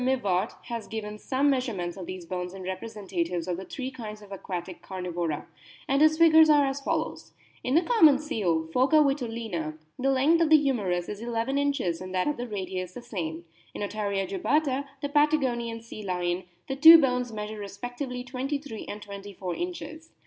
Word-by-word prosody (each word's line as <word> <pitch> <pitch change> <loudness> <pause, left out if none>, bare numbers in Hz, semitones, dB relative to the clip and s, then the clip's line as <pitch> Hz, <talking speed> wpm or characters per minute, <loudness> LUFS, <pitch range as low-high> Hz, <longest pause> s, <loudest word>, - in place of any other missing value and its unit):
Mivart* 215 -7 +1
has 235 -3 -6
owen 210 -1 -5
some 265 +4 0
O - - +6
measurements 220 -10 -2
of 185 -3 -8
these 185 -2 -6
bones 180 +1 -4
in 190 - -8
representatives 185 -3 -3
of 180 - -1
the 190 - -7
three 260 +4 -5
kinds 215 -4 -8
of 200 - -15
aquatic 185 -2 -6
Carnivora, 175 -4 -3 0.4
and 275 +1 +2
his 310 0 +5
figures 320 -1 +7
are 295 -2 +6
as 270 +1 -2
follows: - - -3 0.3
"In 255 +3 0
the 335 - +5
common 325 - +6
seal, 195 - -1
Phoca 260 +5 +3
vitulina, 225 - -2 0.2
the 270 +2 +1
length 280 +6 +4
of 325 - +3
the 315 - +8
humerus 205 -12 0
is 205 +1 -6
1 240 +1 -4
1 230 +4 -1
inches 275 -13 0
and 185 0 -6
that 185 - +1
of 295 - 0
the 245 +1 -4
radius 185 -3 -4
the 245 - -7
same; 170 -8 -5 0.3
in - - -3
Otaria 200 -2 -2
jubata, 300 -7 0 0.2
the 285 - -1
Patagonian 260 -6 +1
sea 230 -2 -9
lion, 180 -2 -2 0.2
the 270 - -2
two 325 +4 +10
bones 250 -4 +1
measure 215 0 -5
respectively 245 +5 -5
23 265 -1 -4
and 210 0 -6
24 200 -2 -6
inches. 325 -2 -6
230 Hz, 185 wpm, -27 LUFS, 185-275 Hz, 0.4 s, two